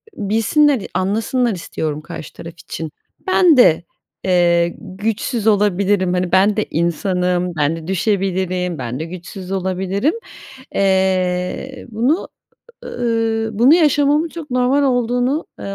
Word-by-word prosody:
bilsinler, 225 +6 +2
anlasınlar 225 +5 0
istiyorum 155 -3 -4
karşı 165 0 -9
taraf 165 0 -9
için: 160 -2 -6 0.4
"Ben 360 -5 +5
de, 175 -9 +5 0.4
eee, 175 -2 +2
güçsüz 220 +3 -3
olabilirim, 200 -2 +2
hani, 180 -1 -1
ben 200 +3 +3
de 215 - +1
insanım, 180 +1 0
ben 150 +1 +1
de 165 0 -9
düşebilirim, 185 -2 -1
ben 125 0 -5
de 160 - -3
güçsüz 185 +2 -9
olabilirim." 190 - -1 0.6
Eee, 190 +5 0
bunu, 250 - 0 0.6
ııı, 225 -2 -1
bunu 260 +7 +6
yaşamamın 295 -1 +3
çok 320 -3 -9
normal 255 +3 +2
olduğunu, 245 +2 0
eee, 195 - -5
195 Hz, 120 wpm, -18 LUFS, 180-245 Hz, 0.6 s, bunu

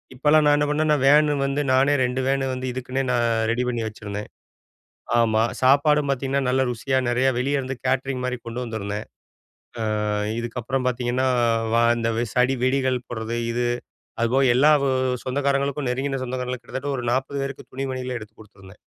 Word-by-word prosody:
இப்பலாம் 150 +4 +4
நான் 145 0 +5
என்ன 145 - +2
பண்ணேன், 155 +1 +1
நான் 150 -3 +2
வேனு 150 +1 +5
வந்து 140 +1 0
நானே 135 +2 +4
2 125 +1 -1
வேனு 135 0 +1
வந்து 130 0 -4
இதுக்குன்னே 130 +1 -3
நான் 120 -1 +2 0.2
ரெடி 120 +2 0
பண்ணி 120 -2 -1
வச்சிருந்தேன். 105 -1 -6 0.9
ஆமா, 110 -1 +3 0.2
சாப்பாடும் 145 +2 +4
பார்த்தீங்கன்னா, 135 +1 0
நல்ல 130 +1 +2
ருசியா 130 +3 -1
நெறைய 125 +2 +2
வெளிய 140 +3 0
இருந்து 130 0 -5
கேட்டரிங் 130 0 -1
மாரி 125 0 -1
கொண்டு 120 +2 -4
வந்திருந்தேன். 105 -2 -4 0.7
அ, - - -1 0.6
இதுக்கப்புறம் 120 +2 -3
பார்த்தீங்கன்னா 125 +1 0 0.5
வா 115 - +4 0.2
இந்த 115 0 0 0.3
சடி 125 +1 +3
வெடிகள் 130 -1 +1
போடுறது 115 0 -4 0.2
இது. 120 +1 0 0.6
அதுபோக 130 +2 +3
எல்லா 140 +5 +5 0.2
ஊ - - +2 0.4
சொந்தக்காரங்களுக்கும் 140 +1 0
நெருங்கின 135 +2 -2
சொந்தக்காரங்களுக் 125 0 -4
கிட்டத்தட்ட 140 +1 -4
ஒரு 125 - -4
40 135 +2 -1
பேருக்கு 135 0 -6
துணி 135 +1 -3
மணிகள் 130 -1 -4
எடுத்து 110 0 -12
கொடுத்துருந்தேன். 95 -2 -16
130 Hz, 160 wpm, -23 LUFS, 120-135 Hz, 0.9 s, நான்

